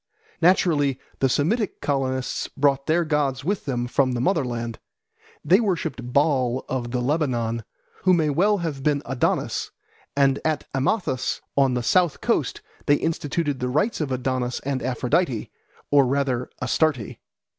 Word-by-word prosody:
Naturally 155 -6 +3 0.2
the 135 - +3
Semitic 195 - 0
colonists 130 -3 -1
brought 140 -1 +2
their 165 +2 +2
gods 145 -3 0
with 200 +3 -1
them 125 -3 -1
from 130 +1 +1
the 120 - -2
mother 160 +3 +2
land. 120 -2 -4 0.7
They 180 +6 +6
worshipped 160 - -2
Baal 130 -3 +2
of 125 -2 -3
the 125 +1 -1
Lebanon, 120 -5 0 0.4
who 185 0 +4
may 155 -3 +2
well 200 +8 +3
have 160 -7 -3
been 145 0 +1
Adonis, 130 -2 -1 0.5
and 135 -1 +3
at 155 -2 -1
Amathus 135 - 0
on 135 -2 +3
the 125 - -1
south 175 +4 +2
coast - - 0 0.3
they 145 - +6
instituted 150 -2 -1
the 125 -1 -1
rites 155 - 0
of 145 -3 -2
Adonis 130 -1 -1
and 135 -1 -2
Aphrodite, 125 +1 0 0.4
or 140 -2 +5
rather 130 -2 0
Astarte. 130 -2 0
140 Hz, 145 wpm, -24 LUFS, 125-155 Hz, 0.7 s, They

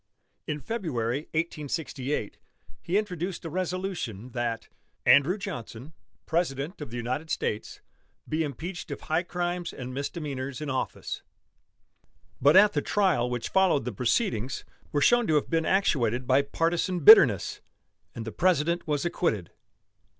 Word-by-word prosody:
In 150 -1 -2
February, 145 - -2
1868, 150 -6 -3 0.4
he 180 +4 0
introduced 180 -4 -3
a 165 - -5
resolution 180 - -3
that 120 -2 -3 0.4
"Andrew 150 +8 +5
Johnson, 150 - -7 0.3
President 160 0 -2
of 150 - -6
the 120 - -6
United 130 +7 -3
States, 105 - -3 0.5
be 155 +1 -1
impeached 160 +5 -6
of - - -6
high 160 +2 0
crimes 175 0 -3
and 130 -1 -7
misdemeanors 140 -2 -4
in 150 -2 -3
office," 130 - -3 1.2
but 145 +5 +6
at 205 +1 +7
the - - +1
trial 185 -12 +1
which 120 -1 -3
followed 185 -10 +3
the 125 - -2
proceedings 125 - -1 0.3
were 145 - +1
shown 240 +9 +4
to 155 - +2
have 150 - 0
been 165 -1 +1
actuated 130 - +1
by 130 +2 +4
partisan 170 +5 -1
bitterness 135 - +7 0.5
and 115 - -5
the 110 - -5
President 170 - +1
was 150 +1 0
acquitted. 115 - -1
150 Hz, 135 wpm, -27 LUFS, 125-175 Hz, 1.2 s, at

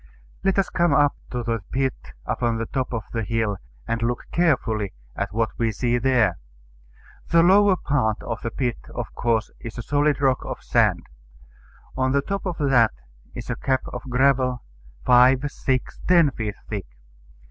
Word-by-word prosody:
Let 195 0 +2
us 195 - +1
come 170 -4 +2
up 145 0 +4
to 125 -1 -3
the 115 -1 -1
pit 135 0 +1 0.3
upon 120 -2 0
the 115 - -2
top 130 +2 -3
of 115 -3 -3
the 115 - -1
hill, 110 -2 -1 0.3
and 115 0 -1
look 120 +1 -1
carefully 120 - +1 0.2
at - - -3
what 115 +1 0
we 115 -1 +1
see 120 +3 0
there. 115 -8 +2 0.9
The 165 0 +5
lower 195 +2 +6
part 130 - 0
of 115 - -4
the 115 - -2
pit 120 -1 -2 0.2
of - - -5
course 115 -1 0
is 115 - -8
a 120 - -4
solid 145 +2 +1
rock 135 -2 +2
of - - -6
sand. - - +2 0.9
On 130 0 +1
the 140 0 +2
top 195 +3 -3
of 180 - -2
that 130 -6 +3 0.4
is - - -5
a - - -1
cap 130 -1 0
of - - -4
gravel, 125 -1 +2 0.4
five, 125 +2 +6
six, 130 -1 -2
ten 170 -5 +5
feet 110 -4 -4
thick. 100 -7 -5
125 Hz, 170 wpm, -23 LUFS, 115-140 Hz, 0.9 s, lower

